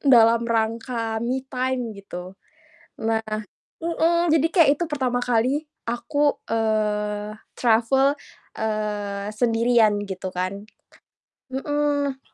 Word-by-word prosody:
dalam 235 -4 +6
rangka 225 0 -1
me 255 +3 -1
time 255 -3 -2
gitu, 185 -2 -8 0.7
nah 225 0 0 0.6
mhm, 335 0 +2
jadi 320 0 +4
kayak 335 -5 +5
itu 345 - -1
pertama 255 -4 0
kali 250 +5 +1 0.2
aku, 240 +5 0
eee, 210 -1 0 0.2
travel, 260 +5 +3 0.4
eee, 210 -2 -2
sendirian 225 -2 +3
gitu 185 0 -5
kan. 185 +3 -3 0.9
Mhm. 285 0 -1
230 Hz, 95 wpm, -24 LUFS, 215-270 Hz, 0.9 s, dalam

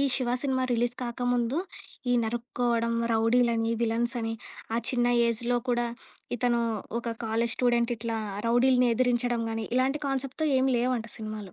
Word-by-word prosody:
"ఈ - - +3
'Shiva' 245 -1 0
cinema 260 -2 +1
release 240 +1 0
కాకముందు, 245 +2 0 0.5
ఈ - - +4
నరుక్కోవడం, 235 0 -1 0.2
రౌడీలని, 230 0 +2
విలన్సని 230 0 0 0.4
ఆ - - +2
చిన్న 245 -2 +1 0.2
ఏజ్‌లో 240 +2 0
కూడా, 240 0 +1 0.5
ఇతను 240 0 +2 0.4
ఒక 235 -1 -3
కాలేజ్ 230 +1 +1
స్టూడెంటిట్లా 235 -2 +1 0.3
రౌడీలని 250 +1 +4
ఎదిరించడం 245 -1 +1
గానీ, 225 -1 -3
ఇలాంటి 265 +3 +1
కాన్సెప్ట్‌తో. 275 +3 -2
ఏం 260 - +2
లేవు" 250 +2 +1
అంట 230 - -8
సినిమాలు. 215 -3 -6
240 Hz, 135 wpm, -28 LUFS, 230-250 Hz, 0.5 s, ఈ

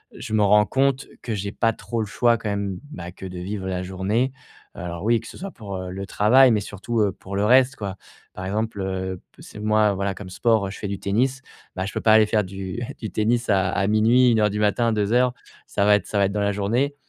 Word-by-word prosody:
heu, - - -11
je 110 - -6
me 105 -1 +3
rends 105 +1 +5
compte 135 +3 +1 0.2
que 115 - -3
j'ai 100 0 -4
pas 115 +1 +1
trop 115 +1 -5
le 110 - -1
choix 120 +3 +2
quand 105 - -4
même. 100 -2 -3
Bah, 90 - -7
que 95 - -11
de 90 -1 -7
vivre 95 +1 -4
la 90 -1 -2
journée. 100 +8 -1 0.4
Alors 85 0 -6
oui, 115 +2 +3
que 115 - -12
ce - - -11
soit 195 +1 -6
pour, 100 - -8
heu, 95 0 -6
le 95 +1 -5
travail, 125 +7 +5
mais 110 - +2
surtout, 105 +3 -3
heu, 100 -2 +2
pour 100 0 -9
le 100 +1 +1
reste, 130 +4 +5
quoi. 100 -6 -5 0.4
Par 95 - -6
exemple, 105 +1 -2
heu, 95 -1 -3
p - - -18
c'est - - -11
moi, 105 -1 +3
voilà, 100 0 -2
comme 95 -2 -9
sport, 110 0 +2
heu, - - -6
je - - -9
fais 105 - -4
du 100 -1 -4
tennis. 130 +6 0 0.3
Bah, 95 0 -2
je 95 - -6
peux - - -3
pas 110 - +5
aller 110 0 +7
faire 105 0 +1
du 95 +4 -6 0.2
du 110 - -5
tennis 115 +3 0
à 95 -2 +3
à 95 - 0
00:00, 115 +4 +4
01:00 110 - +3
heure 105 0 +3
du 105 - -3
matin, 115 +3 +2
2 105 -1 0
heures, 125 0 +3 0.3
ça 100 - 0
va 105 0 +6
être 105 - -2
ça 105 - -2
va 100 - +4
être 95 - -1
dans 105 - -1
la 100 0 +1
journée 120 +8 0
105 Hz, 265 wpm, -23 LUFS, 95-115 Hz, 0.4 s, aller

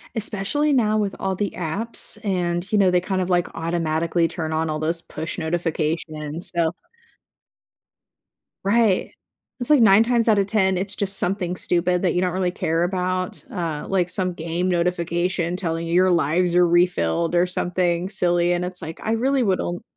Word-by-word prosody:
Especially 225 +8 0
now 215 -4 +2
with 205 -2 -1
all 190 -1 -1
the 205 +1 -2
apps 195 +8 -3
and, 175 -1 -1
you 215 - +3
know, 190 -2 +4
they 180 - +3
kind 185 0 -1
of 180 - -2
like 175 -1 +2
automatically 165 0 0
turn 160 -2 -4
on 160 0 -1
all 155 - -2
those 165 +2 -2
push 160 0 -6
notifications, 160 -1 -2
so 165 -1 +2 1.9
Right. 205 -1 +2 0.5
It's 245 - -1
like 295 - +6
9 210 -1 +7
times 235 0 +1
out 215 -2 +4
of 195 - +2
10, 190 -3 +1
it's 195 +3 -2
just 195 -1 +1
something 180 -1 -1
stupid 180 0 0
that 180 - +2
you 180 - +1
don't 180 -2 0
really 185 -1 0
care 165 -1 -1
about, 185 0 -2
uh, 165 -8 -3
like 180 -2 +1
some 185 -3 -2
game 170 +2 -2
notification 175 0 0
telling 165 -2 -3
you, 170 - -2
"Your 185 +1 +4
lives 170 +2 +2
are 175 0 +5
refilled," 170 - +1
or 175 +1 +4
something 180 0 -1
silly, 175 -2 +1
and 175 0 -1
it's 180 0 -7
like, 160 0 -7
"I 220 - -1
really 260 +4 +1
wouldn't" 185 -4 -1
180 Hz, 175 wpm, -22 LUFS, 170-195 Hz, 1.9 s, 9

